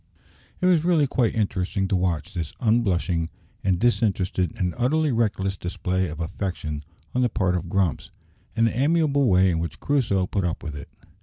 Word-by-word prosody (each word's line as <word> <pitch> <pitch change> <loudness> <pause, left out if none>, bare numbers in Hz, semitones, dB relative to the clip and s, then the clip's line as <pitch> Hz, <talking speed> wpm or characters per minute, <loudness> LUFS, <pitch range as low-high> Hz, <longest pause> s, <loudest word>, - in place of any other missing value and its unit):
It - - +1
was 175 -4 +4
really 170 -4 +3
quite 125 -4 +1
interesting 95 -2 0
to - - +2
watch 90 0 -1
this 85 -5 -4
unblushing, 95 -8 +1 0.3
and 95 -2 +2
disinterested, 95 -6 +1
and 90 -2 0
utterly 150 +5 +1
reckless 105 -5 0
display 90 +1 -2
of 75 0 -7
affection 85 -4 -4 0.3
on 125 - +1
the 125 - +3
part 95 -4 0
of 85 -1 -3
Grumps, 95 -6 0 0.5
and 115 - +3
the 115 - 0
amiable 140 0 +2
way 95 -2 +4
in 80 - 0
which 85 0 -4
Crusoe 115 -10 +1
put 95 +1 -2
up 85 -1 -2
with 80 -4 -5
it. 70 - -9
95 Hz, 175 wpm, -24 LUFS, 90-120 Hz, 0.5 s, was